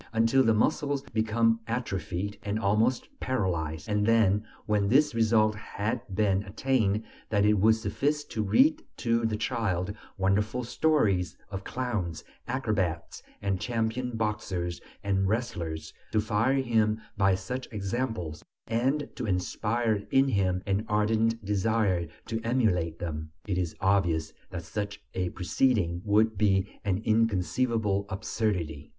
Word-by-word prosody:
until 115 Hz, +4 st, +4 dB
the 115 Hz, -, +4 dB
muscles 140 Hz, +5 st, +1 dB
become 115 Hz, +1 st, +2 dB
atrophied 100 Hz, -4 st, -3 dB
and 105 Hz, +1 st, -2 dB
almost 110 Hz, +3 st, +2 dB
paralyzed; 85 Hz, -10 st, -1 dB
and 105 Hz, 0 st, +1 dB
then, 110 Hz, -3 st, +4 dB, 0.2 s
when 105 Hz, -2 st, +1 dB
this 145 Hz, +4 st, +4 dB
result 110 Hz, -1 st, +3 dB
had 105 Hz, +2 st, -3 dB
been 100 Hz, -2 st, +2 dB
attained, 110 Hz, 0 st, 0 dB, 0.3 s
that 105 Hz, -2 st, +3 dB
it 105 Hz, -, +5 dB
would 110 Hz, +3 st, +5 dB
suffice 145 Hz, +6 st, -1 dB
to 110 Hz, -6 st, -4 dB
read 295 Hz, -, +4 dB
to 115 Hz, -1 st, +1 dB
the 110 Hz, -1 st, -1 dB
child 105 Hz, -5 st, -1 dB, 0.2 s
wonderful 105 Hz, +6 st, +1 dB
stories 110 Hz, -, +1 dB
of 95 Hz, 0 st, -5 dB
clowns, 105 Hz, -11 st, -3 dB, 0.2 s
acrobats 105 Hz, -, -1 dB, 0.2 s
and 95 Hz, -2 st, 0 dB
champion 120 Hz, +1 st, -1 dB
boxers 95 Hz, -6 st, -2 dB, 0.2 s
and 95 Hz, -1 st, +1 dB
wrestlers, 85 Hz, -9 st, -2 dB, 0.2 s
to 110 Hz, -, +2 dB
fire 110 Hz, +5 st, +2 dB
him 110 Hz, -5 st, +2 dB, 0.2 s
by 95 Hz, -2 st, +3 dB
such 125 Hz, +8 st, -5 dB
examples, 100 Hz, -, -3 dB, 0.2 s
and 135 Hz, +6 st, 0 dB
to 120 Hz, -, -3 dB
inspire 105 Hz, +3 st, 0 dB
in 135 Hz, +1 st, +4 dB
him 95 Hz, -4 st, +1 dB
an 100 Hz, +1 st, 0 dB
ardent 110 Hz, +1 st, +1 dB
desire 100 Hz, -3 st, +1 dB, 0.2 s
to 115 Hz, 0 st, -3 dB
emulate 100 Hz, -9 st, +1 dB
them. 80 Hz, -2 st, -4 dB, 0.2 s
It 95 Hz, -3 st, -1 dB
is 85 Hz, -3 st, -2 dB
obvious 90 Hz, -5 st, +1 dB, 0.2 s
that 85 Hz, -2 st, -5 dB
such 100 Hz, +2 st, -4 dB
a 90 Hz, -1 st, -1 dB
proceeding 90 Hz, -1 st, +1 dB
would 105 Hz, 0 st, +2 dB
be 100 Hz, -2 st, +1 dB
an 100 Hz, +1 st, -1 dB
inconceivable 110 Hz, -1 st, +1 dB
absurdity. 95 Hz, -7 st, -2 dB
105 Hz, 130 wpm, -28 LUFS, 95-115 Hz, 0.3 s, it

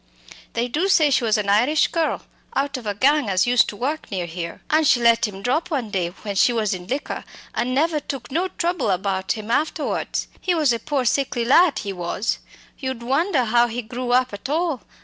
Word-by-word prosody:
They 235 Hz, +1 st, 0 dB
do 315 Hz, +10 st, 0 dB
say 315 Hz, -7 st, +4 dB
she 260 Hz, -2 st, +2 dB
was 220 Hz, -1 st, +3 dB
an 210 Hz, -1 st, -2 dB
Irish 245 Hz, +10 st, +3 dB
girl, 330 Hz, -2 st, -1 dB, 0.3 s
out 275 Hz, 0 st, 0 dB
of 245 Hz, -4 st, -6 dB
a 205 Hz, -, -1 dB
gang 280 Hz, +1 st, +3 dB
as 185 Hz, -1 st, +2 dB
used 245 Hz, 0 st, +4 dB
to -, -, -7 dB
work 285 Hz, +8 st, -3 dB
near 185 Hz, -4 st, -2 dB
here 170 Hz, 0 st, -6 dB
an' 310 Hz, +1 st, +4 dB
she 255 Hz, -, +5 dB
let 230 Hz, -1 st, +4 dB
him 195 Hz, -1 st, -9 dB
drop 310 Hz, +8 st, 0 dB
one 260 Hz, -9 st, -2 dB
day 180 Hz, -3 st, 0 dB
when 200 Hz, +3 st, -7 dB
she 200 Hz, +5 st, +4 dB
was 220 Hz, -4 st, 0 dB
in 180 Hz, -1 st, -7 dB
liquor, 270 Hz, +6 st, -3 dB, 0.3 s
an' 250 Hz, +2 st, -1 dB
never 310 Hz, +2 st, +2 dB
took 275 Hz, -4 st, -7 dB
no 345 Hz, +6 st, 0 dB
trouble 350 Hz, -, -1 dB
about 190 Hz, 0 st, 0 dB
him 215 Hz, +1 st, -6 dB
afterwards. 305 Hz, +4 st, -1 dB
He 360 Hz, -2 st, +1 dB
was 300 Hz, -6 st, +3 dB
a 230 Hz, -, -2 dB
poor 280 Hz, -2 st, -1 dB
sickly 250 Hz, -1 st, 0 dB
lad, 310 Hz, +4 st, +5 dB
he 200 Hz, -2 st, -4 dB
was! 180 Hz, +4 st, -2 dB, 0.4 s
you'd 260 Hz, -3 st, -4 dB
wonder 275 Hz, +3 st, +1 dB
how 235 Hz, +2 st, +3 dB
he 240 Hz, +1 st, -4 dB
grew 245 Hz, +3 st, -5 dB
up 250 Hz, -2 st, +2 dB
at 205 Hz, +7 st, -6 dB
all. 315 Hz, -4 st, 0 dB
245 Hz, 215 wpm, -22 LUFS, 210-295 Hz, 0.4 s, she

